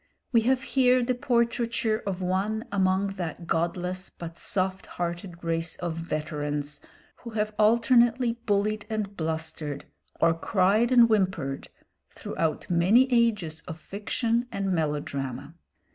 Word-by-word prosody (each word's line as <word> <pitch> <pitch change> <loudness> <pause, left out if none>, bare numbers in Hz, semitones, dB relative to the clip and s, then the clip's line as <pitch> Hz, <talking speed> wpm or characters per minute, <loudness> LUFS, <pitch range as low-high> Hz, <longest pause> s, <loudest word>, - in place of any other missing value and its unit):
We 230 -2 +5
have 265 0 +2
here 255 -2 +3
the 255 +1 +1
portraiture 235 -3 0
of 190 -1 -2
one 200 +5 -1
among 195 0 +1
that 170 -1 -5
godless 180 +3 -1
but 170 -1 -9
soft 190 -1 -1
hearted 175 0 -5
race 165 0 -1
of 170 -2 -4
veterans 150 -2 -3 0.4
who 235 - -9
have 215 0 0
alternately 235 +2 +4 0.2
bullied 210 +1 +1
and 210 -2 -3
blustered, 160 -3 -3 0.3
or 165 0 +4
cried 200 +7 +2
and 245 -2 +8
whimpered, 185 -11 0 0.4
throughout 160 -2 -3
many 210 +10 +4
ages 210 -10 +1
of 160 -3 -7
fiction 230 +6 -1
and 195 -1 -1
melodrama. 145 -3 -3
190 Hz, 125 wpm, -27 LUFS, 165-225 Hz, 0.4 s, and